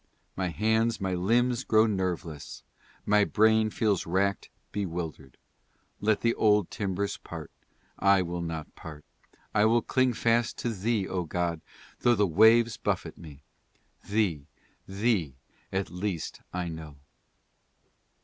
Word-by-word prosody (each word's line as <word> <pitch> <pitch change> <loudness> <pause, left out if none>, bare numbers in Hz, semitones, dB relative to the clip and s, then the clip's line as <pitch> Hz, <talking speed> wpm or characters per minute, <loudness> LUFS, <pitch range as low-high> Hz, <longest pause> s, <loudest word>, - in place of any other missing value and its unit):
" - - -42
My 95 -1 -1
hands, 110 +5 +1
my 95 -2 -1
limbs 120 +7 +1
grow 110 0 +4
nerveless, 90 -7 -3 0.4
My 105 0 +4
brain 110 +1 +3
feels 105 -5 0
rack'd, 100 +3 0 0.2
bewilder'd, 80 -8 -5 0.6
Let 105 +1 +1
the 115 0 +2
old 105 -4 +2
timbers 100 -1 -2
part, - - -9 0.5
I 100 -1 +4
will 85 0 -4
not 80 -2 -5
part, 75 -2 -11 0.5
I 105 0 +4
will 115 +1 +3
cling 130 -1 +2
fast 115 0 +1
to 120 - -2
Thee, 105 0 -1
O 90 -2 -2
God, 85 0 -2 0.4
though 120 0 +4
the 105 -1 +3
waves 110 +5 +5
buffet - - -2
me, 75 -3 -13 0.7
Thee, 95 -9 0 0.4
Thee 95 - 0 0.4
at 95 0 -2
least 90 -2 -4
I 90 -1 -3
know." 80 -3 -8
100 Hz, 130 wpm, -28 LUFS, 85-110 Hz, 0.7 s, waves